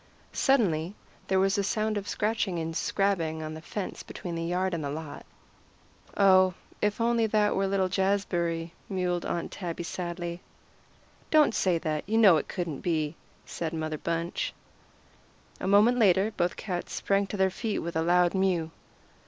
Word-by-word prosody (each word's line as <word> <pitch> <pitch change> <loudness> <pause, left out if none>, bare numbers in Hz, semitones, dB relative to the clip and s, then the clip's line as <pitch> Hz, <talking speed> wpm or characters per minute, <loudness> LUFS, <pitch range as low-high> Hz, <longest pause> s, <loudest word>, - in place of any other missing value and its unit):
Suddenly 195 - +2 0.3
there 190 0 +2
was 195 +2 +2
a - - +1
sound 215 +1 0
of 205 -1 -3
scratching 210 -2 -1
and 165 0 -3
scrabbling 165 -6 0
on 155 0 -5
the 160 - -8
fence 190 +3 -5
between 175 - -7
the 165 0 -3
yard 180 +2 0
and 165 -2 -2
the 140 - -2
lot. 150 0 -7 0.9
"Oh, 185 -2 +5 0.3
if 210 0 +1
that - - -21
were 230 - +2
only 235 -1 +2
little 195 -3 +2
Jazbury," 175 -4 0 0.2
mewed 180 -2 -1
Aunt 170 - -3
Tabby 175 -2 -5
sadly. 175 0 -5 0.9
"Don't 305 -5 +5
say 185 -5 +2
that; 155 -2 -2
you 220 - +2
know 200 -7 +7
it - - -3
couldn't 175 -6 -4
be," 155 -2 -1 0.3
said 165 -1 -4
Mother 155 -1 -3
Bunch. 170 +1 -2 1.0
A - - -3
moment 210 +5 +5
later 200 0 +4
both 175 0 0
cats 180 -4 -4
sprang 200 0 +1
to 205 - -5
their 190 -1 +3
feet 220 +2 -2
with 170 0 -4
a 160 - +2
loud 175 +1 +3
mew. 185 -4 +1
185 Hz, 165 wpm, -28 LUFS, 165-200 Hz, 1.0 s, know